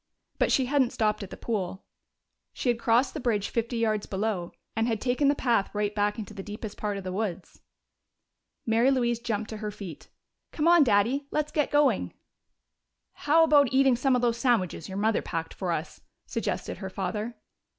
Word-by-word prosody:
But - - +2
she 265 - +3
hadn't 265 -2 +2
stopped 215 -1 0
at 195 - -6
the - - -9
pool; 190 -4 -3 0.7
she 250 - -2
had 240 -1 +1
crossed 240 +3 +2
the 310 - -4
bridge 220 -6 0
fifty 235 +1 -2
yards 215 -2 0
below 190 -3 -2 0.2
and 225 +1 +1
had 225 -3 0
taken 255 +4 +1
the 285 - +4
path 235 -7 +1
right 205 0 0
back 205 +1 0
into 215 -1 -7
the 200 - -6
deepest 210 +1 -7
part 205 -1 -3
of 195 - -6
the 185 - -4
woods. 190 -3 -4 1.0
Mary 230 +3 +3
Louise 240 -3 +1
jumped 220 -2 -3
to 220 - -5
her 210 0 -4
feet. 195 -6 -9 0.4
"Come 310 +1 0
on, 345 -2 +7
Daddy! 245 +5 +2
Let's 300 0 -1
get 300 -2 +1
going!" 270 - +2 1.0
"How 320 +3 +3
about 290 -5 +5
eating 265 -1 +4
some 255 +2 +2
of 245 - 0
those 235 -1 +2
sandwiches 200 - 0
your 190 - -5
mother 215 +1 +2
packed 165 -1 -4
for 185 -3 -3
us?" 160 0 -4 0.2
suggested - - -3
her 190 - -5
father. 210 +5 -3
225 Hz, 190 wpm, -27 LUFS, 205-255 Hz, 1.0 s, on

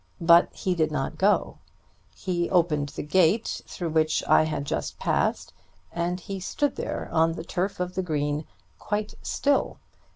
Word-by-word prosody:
But 170 +1 +6
he 185 - -2
did 160 -3 +1
not 135 -3 -3
go. 205 +2 +2 0.6
He 175 -2 -2
opened 160 -6 +2
the - - -6
gate 185 +7 +2
through 175 -3 -4
which 155 0 +2
I - - +5
had 155 -2 -3
just - - -3
passed, - - 0 0.4
and 175 +1 -2
he 195 +2 -6
stood 285 +9 -1
there - - -4
on 165 0 +3
the - - -6
turf 190 +1 -2
of 180 0 -2
the 190 - -1
green, 150 -3 -1 0.3
quite 210 +1 -3
still. 285 -1 0
175 Hz, 160 wpm, -26 LUFS, 155-190 Hz, 0.6 s, But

